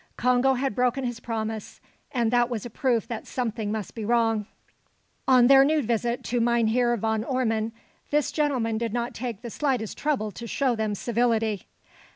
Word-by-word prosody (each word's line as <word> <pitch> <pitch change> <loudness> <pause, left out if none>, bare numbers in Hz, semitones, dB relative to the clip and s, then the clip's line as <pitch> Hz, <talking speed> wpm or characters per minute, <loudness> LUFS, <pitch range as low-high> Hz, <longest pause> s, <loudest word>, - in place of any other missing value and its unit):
Congo 250 +2 +3
had 265 -1 -1
broken 250 +3 +1
his 240 -2 -3
promise; 220 -2 -4 0.3
and 235 -4 +1
that 240 0 +3
was 235 -3 -4
a 240 - -7
proof 240 -1 0
that 230 -2 -6
something 225 -4 -2
must 215 -3 -4
be 225 - -5
wrong. 225 -2 +1 0.8
On 255 -2 +6
their 270 +1 +8
new 300 +1 +2
visit 235 +1 -1
to 245 0 -1
Mynheer 235 +1 +2
Van 220 0 0
Ormon, 225 -3 0 0.4
this 295 -1 +1
gentleman 255 -7 0
did 230 -2 -2
not 240 0 -2
take 235 -3 -5
the 235 - -6
slightest 255 -7 -1
trouble 265 -8 0
to 235 +5 -8
show 260 0 +1
them 215 -2 -1
civility. 225 -2 0
235 Hz, 175 wpm, -26 LUFS, 220-250 Hz, 0.8 s, their